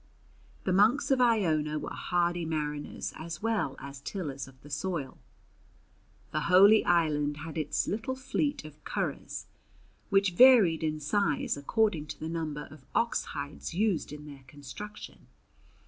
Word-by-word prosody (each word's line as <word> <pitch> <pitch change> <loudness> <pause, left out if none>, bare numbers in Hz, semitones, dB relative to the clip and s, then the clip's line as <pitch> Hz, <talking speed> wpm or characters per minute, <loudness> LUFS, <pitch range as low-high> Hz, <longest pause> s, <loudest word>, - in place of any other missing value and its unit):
The 185 - 0
monks 220 +10 +4
of 265 -1 +4
Iona 160 -11 +2
were - - -5
hardy 175 -1 0
mariners 150 -2 -3
as 160 +3 -7
well 220 -11 0
as 140 -1 -9
tillers 140 -5 -5
of 130 -1 -17
the 145 - -12
soil. 155 -2 -3 1.1
The 155 - 0
holy 200 +4 +7
island 150 -4 +2
had 160 - -7
its 155 -2 -1
little 225 +5 -2
fleet 265 - -2
of 155 0 -13
curraghs - - -4 0.6
which 195 -2 +3
varied 215 -7 +7
in 155 -1 -1
size 155 +1 0
according 160 +2 0
to 145 - -8
the 160 - -4
number 155 -3 -4
of 150 -3 -14
ox 235 0 +1
hides 145 +3 -6
used 200 -6 0
in 150 0 -9
their 140 -2 -11
construction. 150 +10 -10
160 Hz, 145 wpm, -29 LUFS, 150-205 Hz, 1.1 s, holy